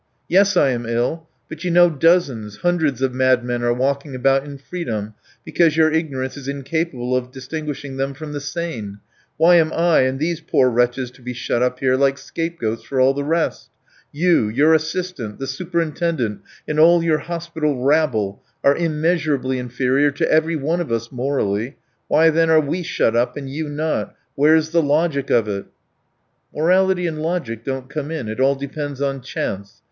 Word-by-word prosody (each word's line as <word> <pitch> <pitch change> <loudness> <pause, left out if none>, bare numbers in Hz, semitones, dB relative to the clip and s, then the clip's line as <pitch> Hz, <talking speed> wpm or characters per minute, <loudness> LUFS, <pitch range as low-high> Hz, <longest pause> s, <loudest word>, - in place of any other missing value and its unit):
"Yes, 195 +1 +3
I 140 - +4
am 120 -2 -3
ill. 120 +8 -1 0.2
But 155 +2 -9
you 180 - -1
know 175 +1 +6
dozens, 140 - +1
hundreds 160 -7 +1
of 130 -1 0
madmen 125 -2 +1
are 120 0 +1
walking 135 +3 -1
about 135 +2 +2
in 145 -1 -9
freedom 120 - -5 0.3
because 165 -3 +2
your 160 -1 +4
ignorance 140 -5 -2
is 135 -2 -9
incapable 140 -2 -2
of 125 0 -2
distinguishing 145 0 -6
them 135 +1 -2
from 150 +1 -7
the 145 - -3
sane. 145 - -5 0.4
Why 170 +3 +6
am 160 -1 +3
I 170 0 +3
and 130 +1 +1
these 165 +2 -1
poor 130 -5 +2
wretches 125 +1 0
to 125 - -20
be 125 0 -5
shut 120 0 -2
up 125 0 0
here 130 -1 +3
like 135 0 +2
scapegoats 165 -12 -4
for 135 - -3
all 130 +1 +5
the 140 +1 -3
rest? 165 +3 -1 0.4
You, 160 -8 +2
your 145 +8 +4
assistant, 160 - -2
the 135 - -5
superintendent, 165 - -2 0.3
and 150 0 -1
all 170 +1 +6
your 160 -2 +2
hospital 165 -5 -3
rabble, 130 -9 +1 0.2
are 140 - +5
immeasurably 155 -5 0
inferior 130 +3 +1
to 140 - -1
every 160 +1 +2
one 160 +4 -1
of 165 - -5
us 115 0 -2
morally; 125 -2 -2 0.3
why 160 +1 +4
then 165 +1 +2
are 160 -1 +6
we 155 +4 -2
shut 115 -8 0
up 120 +4 +1
and 140 -1 -6
you 155 +2 -4
not? 155 +2 -2 0.2
Where's 155 +2 +3
the 170 0 +3
logic 145 -1 0
of 115 -2 +3
it?" 100 -1 -3 0.9
"Morality 180 +3 +2
and 155 -2 -3
logic 155 -10 -3
don't 135 0 -4
come 145 +1 -5
in, 155 -9 -4
it 110 - -5
all 135 +1 +3
depends 140 0 -5
on 135 -1 -2
chance. 100 -5 -5
140 Hz, 180 wpm, -20 LUFS, 130-160 Hz, 0.9 s, know